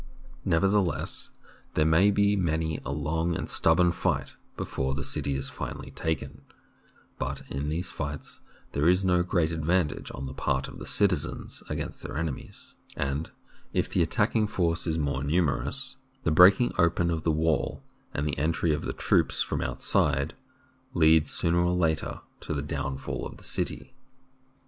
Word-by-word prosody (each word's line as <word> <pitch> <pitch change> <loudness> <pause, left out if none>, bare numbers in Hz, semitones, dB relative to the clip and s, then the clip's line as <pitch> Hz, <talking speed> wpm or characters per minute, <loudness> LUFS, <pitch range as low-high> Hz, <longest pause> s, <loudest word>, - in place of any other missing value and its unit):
Nevertheless, 95 +1 +1 0.5
there 75 - +3
may 80 +6 +5
be 100 0 +3
many 80 -4 0
a 65 - -4
long 80 +4 -1
and - - -3
stubborn 85 +2 +4
fight - - -1 0.2
before 65 0 -2
the 70 - -3
city 70 +1 0
is 70 0 -1
finally - - -6
taken; 80 -3 -3 0.8
but - - -3
in 70 +2 -2
these 85 +4 -2
fights 70 0 -6 0.3
there 75 +4 +2
is 90 +2 +3
no 90 -1 +3
great 85 -2 +1
advantage 80 0 0
on 65 - -5
the 65 - -6
part 65 0 -1
of - - -10
the - - -7
citizens 90 -7 +1
as - - -19
against - - -4
their - - -6
enemies, 80 -4 -5 0.2
and 70 +3 -2 0.4
if - - +1
the - - +2
attacking 110 -2 +2
force 85 -3 0
is 80 -1 0
more 70 -3 -1
numerous, 90 - 0 0.3
the 80 - +1
break 90 +5 +8
ing 120 - +1
open 85 +1 +3
of 80 -1 -1
the 80 - 0
wall 80 +1 0 0.3
and 75 +1 -2
the 70 - -2
entry 80 +1 +1
of 75 - -1
the - - -2
troops - - +2
from - - -2
outside 70 +1 +1 0.6
lead 80 -2 +5
sooner 85 +3 +1
or 85 +1 +2
later 80 -3 0 0.2
to - - -4
the 70 - -2
downfall 70 -2 -4
of - - -7
the - - -15
city. 130 - -1
80 Hz, 165 wpm, -28 LUFS, 75-90 Hz, 0.8 s, break